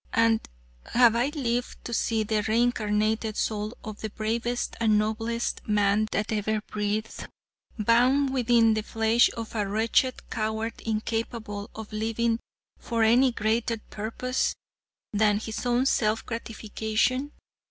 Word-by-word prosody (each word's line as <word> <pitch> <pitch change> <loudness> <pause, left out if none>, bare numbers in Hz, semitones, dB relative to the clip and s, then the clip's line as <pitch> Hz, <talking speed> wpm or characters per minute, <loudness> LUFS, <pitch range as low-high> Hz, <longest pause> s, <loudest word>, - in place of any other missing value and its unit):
And 230 -1 +4 0.5
have 235 -2 +6
I 240 +3 +2
lived 245 -5 -3
to 235 - -4
see 225 -1 +1
the 215 0 0
reincarnated 220 -1 +1
soul 215 +1 -2
of 215 -1 -8
the 220 - -3
bravest 230 +3 -2
and 220 -2 +3
noblest 225 +2 -1
man 210 0 +2
that 210 +2 -1
ever 215 0 0
breathed, 210 +1 -3 0.5
bound 250 +5 +3
within 235 -3 +4
the 215 - 0
flesh 225 +2 +3
of 225 -1 -6
a 210 -3 -1
wretched 225 +5 +1
coward 220 0 -2
incapable 220 -1 -3
of 220 -1 -8
living 225 +1 0 0.4
for 230 -1 0
any 245 +4 +5
greater 225 +1 0
purpose 230 +4 -2 0.6
than 210 0 +3
his 220 +2 -4
own 245 +2 +2
self 220 -4 +1
gratification? 230 +4 -1
225 Hz, 130 wpm, -27 LUFS, 215-235 Hz, 0.6 s, have